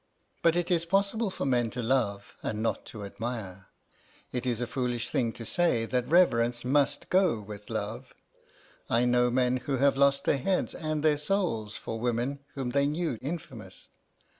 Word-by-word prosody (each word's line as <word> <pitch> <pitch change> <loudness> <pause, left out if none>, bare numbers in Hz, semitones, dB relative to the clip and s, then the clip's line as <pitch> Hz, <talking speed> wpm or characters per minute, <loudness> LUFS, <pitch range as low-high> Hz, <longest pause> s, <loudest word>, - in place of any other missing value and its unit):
But 165 0 +4
it 175 0 0
is 170 -2 +3
possible 200 +5 +1
for 185 - -4
men 120 -3 +2
to 125 +2 -4
love 110 -5 0
and 110 0 -3
not 115 - -1
to 105 -3 -8
admire. 100 -3 -6 0.6
It 125 0 -3
is 120 -2 0
a 120 - 0
foolish 120 -1 -2
thing 115 -3 +1
to 115 - -8
say 145 -6 +1
that 125 +1 -1
reverence 120 -9 +3
must 140 +2 +1
go 185 - +3
with 105 0 -10
love. - - -4 0.8
I 120 +2 +3
know 125 0 +3
men 125 0 +2
who 135 +2 -2
have 140 +1 +3
lost 140 0 +4
their 140 - +2
heads 185 +7 0
and 155 -1 -2
their 150 -2 +3
souls 150 - -1
for 115 - -5
women 120 +4 -1 0.2
whom 130 -3 -2
they 140 +2 +2
knew 150 -5 -2
infamous. 155 +5 -7
125 Hz, 175 wpm, -29 LUFS, 115-155 Hz, 0.8 s, But